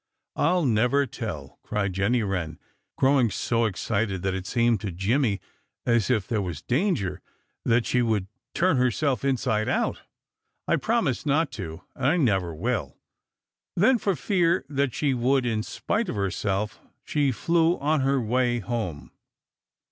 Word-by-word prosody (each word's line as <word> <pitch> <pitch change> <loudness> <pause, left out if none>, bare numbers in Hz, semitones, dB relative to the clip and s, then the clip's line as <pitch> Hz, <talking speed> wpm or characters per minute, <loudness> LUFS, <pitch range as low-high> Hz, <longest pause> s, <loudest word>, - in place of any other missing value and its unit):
I'll 175 +2 +2
never 125 +4 +3
tell!" 95 - -7
cried 100 -2 -2
Jenny 105 +5 +1
Wren, 90 -6 -3 0.4
growing 130 -3 +4
so 115 +3 0
excited 100 -2 -1
that 95 -1 0
it 95 0 -4
seemed 115 -2 +2
to 100 - -3
Jimmy 100 +4 +1 0.5
as 115 -2 +2
if 110 -6 +1
there 110 -3 0
was 85 -5 -5
danger 120 - 0 0.4
that 120 0 +3
she 125 - +2
would 110 -5 +1 0.3
turn 175 -4 +3
herself 125 +1 +1
inside 125 -5 0
out. - - 0 0.7
"I - - +3
promised 200 - 0
not 145 +1 +2
to 80 -8 -7
and 130 - -4
I 160 +5 +3
never 95 - +1
will!" 95 - -2 0.8
Then, 230 +7 +4
for 195 -2 0
fear 170 -1 +1
that 140 -3 0
she 145 -3 +1
would 130 +1 +2
in 110 -3 0
spite 205 - -2
of - - -3
herself, 100 +1 -2 0.2
she 145 -3 +1
flew 165 +6 +2
on 150 0 +1
her 135 +1 +2
way 120 +1 +1
home. 105 -8 -4
120 Hz, 150 wpm, -26 LUFS, 100-140 Hz, 0.8 s, growing